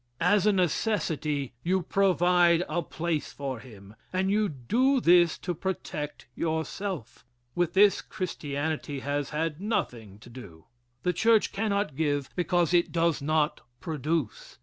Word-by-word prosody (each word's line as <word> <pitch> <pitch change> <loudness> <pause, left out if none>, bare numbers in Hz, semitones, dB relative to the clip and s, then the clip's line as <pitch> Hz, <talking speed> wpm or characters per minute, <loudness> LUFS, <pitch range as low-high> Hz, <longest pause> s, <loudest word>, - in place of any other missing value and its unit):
As 200 +3 +3
a - - +6
necessity, 160 - 0
you 185 +4 0
provide 180 -3 +3
a 165 +3 -1
place 165 -2 -3
for 135 -4 -5
him. 105 -4 -13 0.2
And 190 +1 0
you 210 0 +2
do 245 - +1
this 175 -5 +5
to 180 - -3
protect 155 -4 -5
yourself. 160 - -4 0.3
With 175 -1 0
this 200 +1 +5
Christianity 150 -4 -4
has 145 0 -2
had 155 +1 -2
nothing 120 - -3
to 120 - -13
do. 100 -10 -12 0.4
The 180 - +1
church 225 +4 +3
cannot 200 -7 -1
give, 145 -2 -1
because 175 -1 +1
it 175 -1 +3
does 165 -2 +1
not 155 +1 +1 0.2
produce. 155 - -3
165 Hz, 135 wpm, -28 LUFS, 145-185 Hz, 0.4 s, a